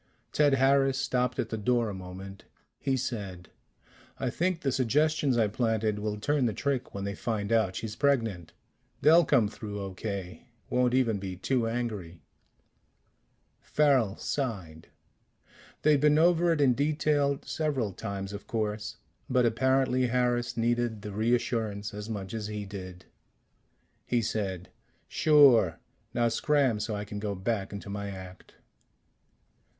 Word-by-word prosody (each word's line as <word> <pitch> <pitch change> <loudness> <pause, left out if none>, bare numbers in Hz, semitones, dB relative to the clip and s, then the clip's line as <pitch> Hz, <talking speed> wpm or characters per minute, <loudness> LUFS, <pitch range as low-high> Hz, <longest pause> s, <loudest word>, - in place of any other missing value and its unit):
Ted 145 -2 +4
Harris 135 0 +3
stopped 125 -2 0
at 115 - -2
the 110 - -3
door 120 +2 +1
a 105 - -4
moment. 95 +1 -9 0.3
He 135 -1 0
said, 100 -8 -5 0.7
"I 130 -2 -1
think 180 +3 -1
the 135 - 0
suggestions 140 +2 +2
I 110 -2 +3
planted 110 -1 0
will 105 0 -2
turn 145 +2 +1
the 110 - -2
trick 130 0 -2
when 100 - -4
they 100 0 -3
find 105 0 -3
out 110 -5 +2
she's 110 -1 -5
pregnant. 115 - 0 0.5
They'll 165 +2 +6
come 130 -7 +3
through 105 -1 -7
okay 95 -1 -6 0.2
won't 125 0 +2
even 115 -6 +2
be 95 -1 -5
too 120 +5 0
angry." 105 -8 -4 1.4
Farrel 130 -9 +2
sighed. 95 - -4 1.0
They'd 150 -2 +4
been 150 0 +5
over 170 +1 +4
it 155 -3 +1
in 130 -3 +5
detail 145 0 +1
several 135 -10 -1
times, 100 +1 -5
of 100 - -8
course, 110 0 -3 0.3
but 125 -2 +3
apparently 130 +2 +2
Harris 120 -1 0
needed 120 -2 0
the 105 - -5
reassurance 110 -1 -1
as 105 +1 -6
much 100 -3 -5
as 110 -2 -3
he 105 -1 -5
did. 95 -2 -9 1.0
He 120 -2 +1
said: 95 -4 -3 0.4
"Sure. 135 - +5 0.3
Now 120 0 +1
scram 135 -1 +2
so 110 0 -2
I 105 0 -4
can 105 0 -6
go 100 -1 -3
back 100 +1 -2
into 100 0 -7
my 100 0 -4
act." 95 -1 -10
115 Hz, 145 wpm, -29 LUFS, 100-130 Hz, 1.4 s, They'll